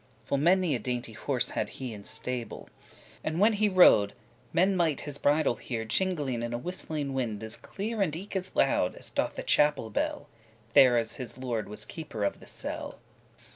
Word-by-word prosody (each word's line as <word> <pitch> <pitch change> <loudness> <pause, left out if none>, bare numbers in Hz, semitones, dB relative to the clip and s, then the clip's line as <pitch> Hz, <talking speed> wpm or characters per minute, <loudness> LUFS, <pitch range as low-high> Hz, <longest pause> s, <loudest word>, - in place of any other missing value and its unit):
Full 140 - 0
many 175 +1 +3
a 125 - 0
dainty 120 0 -3
horse 125 +3 -1
had - - -2
he 130 -3 -5
in 100 -1 -9
stable: 125 -4 -4 0.5
And 160 +2 -2
when 215 +3 +5
he 210 0 +2
rode, 140 - +6 0.4
men 190 +3 +3
might 165 -6 +1
his 145 -1 -5
bridle 145 -3 +2
hear 115 -3 -4
Jingeling 145 - 0
<15> - - -4
in 120 0 -3
a - - 0
whistling 150 -1 -4
wind 115 -5 -2
as 110 +1 -4
clear, 215 +2 -4
And 160 -6 +1
eke 195 +4 -7
as 185 0 -3
loud, 95 -9 +2
as - - -5
doth - - -1
the - - -4
chapel 150 -7 +3
bell, - - -2 0.5
There 125 -2 +7
as 115 -1 0
this 125 -1 -6
lord 120 -5 -3
was 105 - -5
keeper 145 -10 -6
of 100 - -1
the - - -14
cell. - - -5
135 Hz, 195 wpm, -29 LUFS, 115-175 Hz, 0.5 s, There